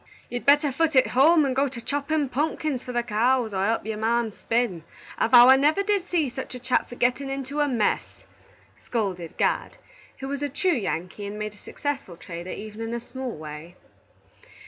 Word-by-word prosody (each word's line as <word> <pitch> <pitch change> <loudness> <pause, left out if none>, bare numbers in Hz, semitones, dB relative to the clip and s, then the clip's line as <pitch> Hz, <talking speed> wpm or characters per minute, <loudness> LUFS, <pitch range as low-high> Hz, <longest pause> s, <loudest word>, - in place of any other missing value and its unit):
"You'd 245 +1 -5
better 290 0 +5
foot 320 +2 0
it 260 - +5
home 305 +4 +5
and 260 -2 -1
go 275 +2 +2
to 255 -3 -7
choppin' 285 +3 -1
punkins 290 -1 -1
for 250 - -6
the 240 -1 0
cows, 235 +1 +1
or 190 0 0
help 225 +2 0
your 215 -1 -4
marm 230 0 +1
spin. 225 -6 -1 0.4
I - - +3
vow 245 +1 +8
I 265 +1 +8
never 305 +8 +3
did 400 -3 0
see 325 -5 +1
such 260 +1 -6
a - - -6
chap 250 +1 0
for 245 - -8
gettin' 250 +3 0
into 275 +2 -4
a 295 - +3
mess," 235 -6 -1 0.6
scolded 190 -8 -3
Gad, - - 0 0.4
who 270 - -6
was 280 +1 -4
a 290 - -1
true 365 +7 +1
Yankee, 200 - -3
and 205 +1 -6
made 215 0 -4
a - - -17
successful 270 - -5
trader, 170 +1 -8
even 215 +3 -7
in 225 +1 -3
a - - -2
small 255 -1 -6
way. 155 +3 -9
245 Hz, 200 wpm, -25 LUFS, 215-280 Hz, 0.6 s, vow